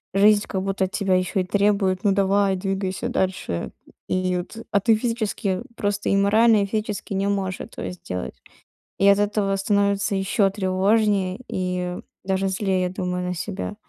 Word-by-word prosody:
жизнь 205 +1 +5
как 190 -2 -2
будто 195 -1 0
от 185 - -7
тебя 195 -3 0
ещё 185 +2 0
и - - 0
требует: 200 0 +1
"Ну 200 - +4
давай, 195 0 +2
двигайся 190 0 -2
дальше". 85 - -2 0.4
И 185 0 0
вот, 180 +5 -6
а 200 - +4
ты 225 +2 +4
физически 220 -4 -1
просто 205 -1 -1
и 195 - +3
морально, 215 +2 +4
и - - 0
физически 210 -1 -3
не 195 +1 0
можешь 195 -2 -1
этого - - -6
сделать. 90 - -6 0.7
И 200 - +4
от 200 0 +6
этого 205 -1 +1
становится 200 0 +1
ещё 195 +1 +2
тревожнее, 195 +1 +1
и 180 -1 -2 0.3
даже 190 0 0
злее, 190 -1 0
я 180 - +1
думаю, 180 -1 -3
на 180 - -2
себя. 200 +3 -4
195 Hz, 170 wpm, -23 LUFS, 185-205 Hz, 0.7 s, от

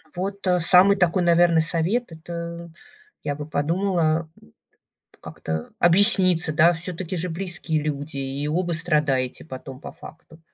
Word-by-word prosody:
Вот, 195 +2 -5
а, 180 -1 +2
самый 185 +4 +5
такой, 180 0 +1
наверно, 170 -1 +4
совет, 170 +8 -1
это, 170 +1 -8 0.5
я 145 - -3
бы 150 0 -7
подумала, 165 +1 -1
м, - - -20 0.7
как-то 80 0 -6
объясниться, 180 -3 +4
да. 170 +2 +4
Всё-таки 175 +1 -5
же, 180 +2 -3
близкие 175 -3 -2
люди, 145 -1 -5
и 135 +2 -4
оба 175 +2 -1
страдаете 150 -6 -1
потом, 130 -1 -10
по - - -9
факту. 160 0 -15
165 Hz, 135 wpm, -23 LUFS, 155-180 Hz, 0.7 s, самый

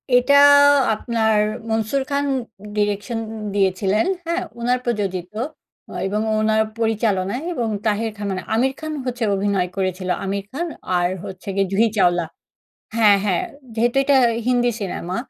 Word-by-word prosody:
এটা 265 +3 +4 0.6
আপনার 220 -1 0 0.3
মনসুর 225 +5 0
খান 280 0 0 0.5
direction 205 +3 -1 0.4
দিয়েছিলেন, 195 +1 +1 0.2
হ্যাঁ? 335 +2 -1 0.2
ওনার 245 +1 +1
প্রযোজিত 195 -6 -2
অ - - +1 0.6
এবং 210 +2 -1 0.2
ওনার 220 0 +2 0.2
পরিচালনায় 220 +1 0
এবং 235 -7 -1 0.2
তাহের 220 +1 0
খান, 205 - -6
মানে 185 -1 -4
আমির 265 +4 +2
খান 315 -1 -5
হচ্ছে 245 -2 -3
অভিনয় 195 -2 0
করেছিল, 185 -1 -2 0.2
আমির 195 0 -2
খান 340 +6 -3 0.3
আর 175 0 +2 0.2
হচ্ছে 190 -1 -9
গিয়ে 195 -1 +1
জুহি 220 +4 +3
চাওলা। 175 -3 +3 0.7
হ্যাঁ, 210 -3 +6
হ্যাঁ 185 -4 +1 0.3
যেহেতু 235 +3 +1
এটা 280 0 +4 0.3
হিন্দি 245 -1 +2
সিনেমা। 185 -2 -4
215 Hz, 135 wpm, -21 LUFS, 195-240 Hz, 0.7 s, হ্যাঁ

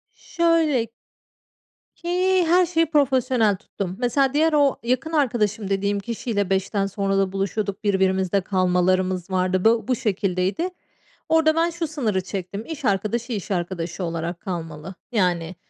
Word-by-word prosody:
Şöyle 330 -7 +1 1.1
ki, 365 +1 +1
her 355 +2 +5
şeyi 330 -1 +2
profesyonel 260 -8 +2
tuttum. 190 -2 -6
Mesela, 260 +2 +2
diğer 315 +2 +3
o 285 -2 +4
yakın 255 +7 -1
arkadaşım 220 -8 0
dediğim 200 +1 0
kişiyle 210 -1 -2
17.00'den 195 +1 0
sonra 195 0 -1
da 195 -1 +1
buluşuyorduk, 195 +1 -2
birbirimizde 190 -1 +2
kalmalarımız 185 -1 +1
vardı. 185 0 0
Bu 225 +1 +3
bu 255 - +2
şekildeydi. 195 - -1 0.6
Orada 320 -1 +4
ben 330 +1 +2
şu 340 -1 -3
sınırı 235 -11 -1
çektim, 195 +3 -6
iş 310 -4 -6
arkadaşı, 220 +5 0
iş 205 -2 -5
arkadaşı 175 0 -3
olarak 170 0 -3
kalmalı. 165 -1 -6 0.2
Yani, 180 -5 0
205 Hz, 135 wpm, -23 LUFS, 185-275 Hz, 1.1 s, her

